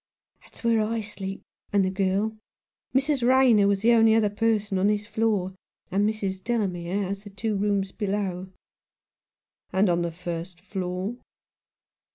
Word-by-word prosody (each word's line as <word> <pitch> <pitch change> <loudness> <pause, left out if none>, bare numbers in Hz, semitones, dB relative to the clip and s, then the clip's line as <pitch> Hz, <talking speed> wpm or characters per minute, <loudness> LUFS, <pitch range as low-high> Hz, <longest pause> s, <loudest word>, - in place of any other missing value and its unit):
"That's - - -16
where 230 -1 +3
I 225 +1 -1
sleep, 195 -2 -6 0.3
and 200 -2 +3
the 185 - 0
girl. 195 +3 0 0.6
Mrs. 275 0 +2
Rayner 245 -4 +5
was 200 0 +1
the 235 - +5
only 225 -1 +5
other 215 -2 +3
person 210 -2 0
on 195 - +3
this 210 0 +1
floor, 210 -3 0 0.4
and 200 +3 +2
Mrs. 195 -3 -3
Delamere 195 -5 -1
has 195 +1 -4
the 205 - -11
two 210 +2 -2
rooms 200 -1 0
below." 195 -3 -2 1.2
"And 190 0 +3
on 170 0 +1
the 170 -1 -1
first 175 +1 -6
floor?" 190 +3 -4
205 Hz, 150 wpm, -26 LUFS, 190-220 Hz, 1.2 s, Rayner